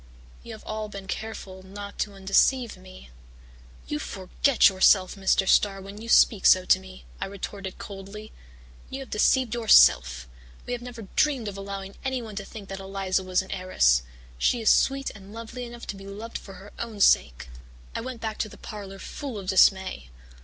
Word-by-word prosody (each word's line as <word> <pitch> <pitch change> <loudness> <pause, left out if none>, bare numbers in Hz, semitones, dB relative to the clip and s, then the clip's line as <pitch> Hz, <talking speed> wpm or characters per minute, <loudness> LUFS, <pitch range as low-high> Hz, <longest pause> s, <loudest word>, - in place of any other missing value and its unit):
You 235 - -9
have 220 - -11
all 215 0 -4
been 200 -1 -8
careful 190 -2 -6
not 200 +2 -9
to 205 - -2
undeceive 210 +5 +2
me.' 185 - -14 0.7
"'You 150 - -3
forget 200 - +2
yourself, 190 0 +4
Mr. 195 -1 +1
Starr, 195 0 +3
when 200 +2 -10
you 230 - -8
speak 215 -3 +5
so 185 0 +6
to - - +5
me,' 60 -1 -13
I - - -3
retorted 195 0 -7
coldly. 200 +2 -9 0.6
'You 270 +1 -6
have 265 - -10
deceived 245 +2 +2
yourself. 65 - +5 0.4
We 245 - -3
have 245 - -4
never 240 -2 -8
dreamed 275 -7 +2
of 200 - -5
allowing 195 0 -7
anyone 250 -5 -3
to 200 - -4
think 205 -2 -10
that 195 0 -6
Eliza 195 -1 -1
was 185 0 0
an 190 - -11
heiress. 65 - +2 0.4
She 245 - +2
is 225 - +4
sweet 275 0 +2
and 200 0 -13
lovely 230 +2 -7
enough 240 0 -10
to - - -5
be 195 0 -11
loved 215 +4 -7
for 195 - -12
her 200 +2 -13
own 225 -3 -5
sake.' 65 - +3 0.4
"I - - -3
went 250 -1 -7
back 220 -1 -4
to 215 - -1
the - - -13
parlour 200 -3 -8
full 255 +4 -7
of 190 -2 -6
dismay. 190 - +3
200 Hz, 185 wpm, -26 LUFS, 190-225 Hz, 0.7 s, so